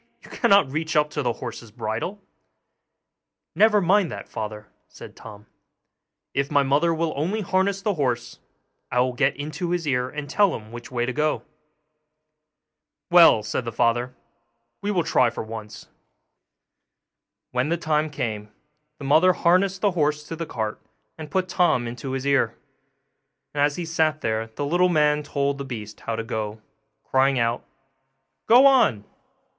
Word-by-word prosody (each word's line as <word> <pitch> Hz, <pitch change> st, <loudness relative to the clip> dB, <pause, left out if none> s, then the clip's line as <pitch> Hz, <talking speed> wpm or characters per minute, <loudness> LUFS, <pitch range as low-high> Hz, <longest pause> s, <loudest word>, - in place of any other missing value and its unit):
you -, -, -15 dB
cannot 200 Hz, -, +3 dB
reach 160 Hz, +3 st, -3 dB
up 150 Hz, 0 st, +2 dB
to 150 Hz, -, -2 dB
the 120 Hz, -3 st, 0 dB
horse's 115 Hz, -2 st, -8 dB
bridle.' 110 Hz, -, -4 dB, 1.3 s
'Never 215 Hz, -1 st, +4 dB
mind 190 Hz, -1 st, +2 dB
that, 100 Hz, -, -7 dB
father,' 105 Hz, -1 st, -6 dB, 0.2 s
said -, -, -13 dB
Tom; 105 Hz, -2 st, -12 dB, 0.9 s
'if 140 Hz, 0 st, -1 dB
my 145 Hz, -2 st, +3 dB
mother 145 Hz, +5 st, +2 dB
will 165 Hz, -1 st, -1 dB
only 180 Hz, +10 st, -1 dB
harness 195 Hz, +1 st, 0 dB
the 210 Hz, -, +1 dB
horse, 125 Hz, -7 st, -2 dB, 0.5 s
I 125 Hz, -, +1 dB
will 125 Hz, 0 st, 0 dB
get 140 Hz, +2 st, +1 dB
into 150 Hz, +5 st, -4 dB
his 175 Hz, -2 st, -1 dB
ear 125 Hz, -2 st, 0 dB
and 150 Hz, 0 st, -6 dB
tell 200 Hz, +6 st, +2 dB
him 110 Hz, 0 st, -10 dB
which 120 Hz, 0 st, -9 dB
way 120 Hz, -1 st, -1 dB
to 130 Hz, -, -3 dB
go.' 150 Hz, +2 st, 0 dB, 1.7 s
'Well,' 170 Hz, -11 st, +7 dB
said 110 Hz, +4 st, -2 dB
the 115 Hz, -, -4 dB
father, 120 Hz, +2 st, 0 dB, 0.7 s
'we 200 Hz, -, -3 dB
will 185 Hz, -5 st, +1 dB
try 125 Hz, -4 st, +3 dB
for 115 Hz, -, -6 dB
once.' 110 Hz, -1 st, -9 dB, 1.6 s
When 125 Hz, +4 st, 0 dB
the 170 Hz, -, +1 dB
time 155 Hz, -1 st, 0 dB
came 110 Hz, -7 st, -4 dB, 0.5 s
the 140 Hz, -, -8 dB
mother 160 Hz, +6 st, +5 dB
harnessed 185 Hz, +3 st, +2 dB
the 205 Hz, -, +3 dB
horse 150 Hz, -3 st, 0 dB
to 165 Hz, -, -4 dB
the 165 Hz, 0 st, -5 dB
cart, 110 Hz, -5 st, -4 dB, 0.3 s
and 155 Hz, -2 st, -9 dB
put 185 Hz, +2 st, 0 dB
Tom 175 Hz, -10 st, +2 dB
into 120 Hz, +3 st, -6 dB
his 135 Hz, 0 st, -3 dB
ear; 135 Hz, -5 st, +1 dB, 1.0 s
and 145 Hz, -, -1 dB
as 145 Hz, 0 st, +2 dB
he 175 Hz, -, -4 dB
sat 160 Hz, -2 st, 0 dB
there 110 Hz, 0 st, -1 dB
the 110 Hz, +6 st, -5 dB
little 175 Hz, +5 st, +2 dB
man 150 Hz, -3 st, +2 dB
told 140 Hz, -1 st, -2 dB
the -, -, -3 dB
beast 110 Hz, -6 st, -7 dB
how 115 Hz, -, -4 dB
to 115 Hz, -, -3 dB
go, 110 Hz, -1 st, -4 dB, 0.4 s
crying 135 Hz, 0 st, +2 dB
out, 115 Hz, 0 st, 0 dB, 0.8 s
'Go 245 Hz, +4 st, +7 dB
on! 230 Hz, -, +4 dB
145 Hz, 160 wpm, -24 LUFS, 120-170 Hz, 1.7 s, Well